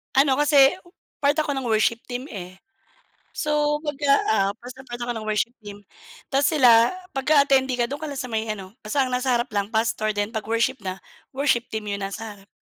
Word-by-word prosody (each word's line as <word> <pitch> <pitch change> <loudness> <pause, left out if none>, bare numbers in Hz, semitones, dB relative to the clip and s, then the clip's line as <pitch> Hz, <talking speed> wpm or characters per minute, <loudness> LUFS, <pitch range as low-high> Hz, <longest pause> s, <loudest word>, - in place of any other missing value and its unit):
Ano 270 0 +4
kasi 285 -2 +6 0.5
part 285 0 +2
ako 305 -2 0
ng 270 -3 -3
worship 225 +1 +2
team, 250 0 -4
eh. 185 -2 -8 0.8
So 295 0 +1
kumbaga, 290 -1 -2 0.2
ah, 195 -2 +2
present 255 +2 -11
part 240 - -5
ako 240 0 -3
ng 215 -1 -6
worship 220 +3 0
team 205 -1 -11 0.5
tas 275 +1 +3
sila, 240 -6 +6 0.2
'pagka 280 +1 +3
attendee 265 -2 +2
ka 240 - +2
do'n 285 +4 -6
ka 310 - -4
lang 280 - -6
sa - - -3
may 220 -1 -3
ano, 195 -2 -6
basta 260 +5 +1
ang 255 - -4
nasa 255 +1 0
harap 240 +2 +1
lang 200 0 -1
pastor 220 -1 0
'pag 210 +2 -3
worship 235 +1 0
na 185 -1 -4 0.3
worship 265 -3 0
team 215 -1 -4
'yong 200 0 -3
nasa 210 +2 -5
harap. 195 0 -20
240 Hz, 200 wpm, -23 LUFS, 215-275 Hz, 0.8 s, kasi